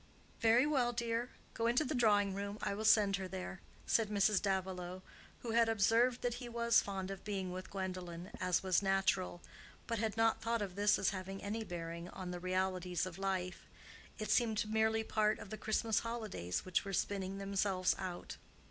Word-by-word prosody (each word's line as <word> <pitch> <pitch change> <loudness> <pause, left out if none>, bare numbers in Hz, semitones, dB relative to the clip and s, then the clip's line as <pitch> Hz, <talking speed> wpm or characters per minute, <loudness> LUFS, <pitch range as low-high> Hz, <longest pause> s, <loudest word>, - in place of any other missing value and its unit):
"Very 230 +3 +5
well, 260 -5 +2
dear; 235 +1 -1 0.2
go 230 0 0
into 245 +6 +3
the 305 - -2
drawing 205 -5 +3
room. 200 +1 -4
I - - 0
will 215 +2 -3
send 205 -2 +5
her 190 -1 -4
there," 185 0 -6 0.2
said 225 -2 +2
Mrs. 205 -1 +3
Davilow, 185 -2 -2 0.4
who 235 - -4
had 230 0 +4
observed 225 +3 +3
that 245 -1 +1
he 245 - -6
was 235 0 +4
fond 195 -1 -4
of 195 - -7
being 195 -3 -3
with 185 +1 -6
Gwendolen, 185 -2 -5
as 185 0 +1
was 185 -1 +3
natural, 195 -2 +1 0.4
but 230 -2 -2
had 220 0 -1
not 225 0 +3
thought 230 -1 0
of 190 -3 -5
this 205 +2 +3
as 195 - +2
having 195 0 -6
any 215 +2 -2
bearing 170 -2 -6
on 185 -1 -6
the 180 - -4
realities 185 -1 -1
of 185 0 -7
life: 190 -2 -2 0.5
it 215 -1 -2
seemed 220 -2 +2
merely 220 0 +2
part 215 -1 +1
of 195 - -10
the - - -3
Christmas 220 0 +1
holidays 215 - -3
which 185 -1 +1
were 195 - -5
spinning 195 0 -1
themselves 195 -1 +1
out. 185 -2 -5
200 Hz, 185 wpm, -36 LUFS, 185-225 Hz, 0.5 s, Very